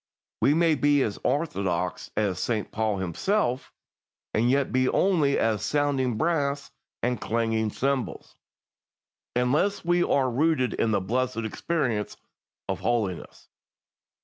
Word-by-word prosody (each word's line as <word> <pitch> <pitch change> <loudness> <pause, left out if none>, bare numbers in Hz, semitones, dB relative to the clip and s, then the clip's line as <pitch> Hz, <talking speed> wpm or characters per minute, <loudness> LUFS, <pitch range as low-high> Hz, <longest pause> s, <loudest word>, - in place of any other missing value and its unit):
We 145 - +4
may 165 -1 +4
be 145 -1 +3
as 100 - -3
orthodox 95 - -1
as 100 -4 0
St. 110 -4 -2
Paul 110 -2 0
himself, 125 - -1 0.6
and 115 +3 +2
yet 140 +1 +2
be 130 0 +2
only 160 -8 +2
as 110 -3 +1
"sounding 135 -5 0
brass 145 -2 0 0.3
and 125 -2 0
clanging 115 -1 0
cymbals," 135 +3 -2 1.0
unless 145 +12 +1
we 175 0 +3
are 135 -6 +2
rooted 140 -1 +1
in 115 - 0
the 105 -3 +1
blessed 125 +5 -1
experience 120 -3 -2 0.5
of - - -2
holiness. 105 -8 -2
130 Hz, 120 wpm, -26 LUFS, 110-145 Hz, 1.0 s, We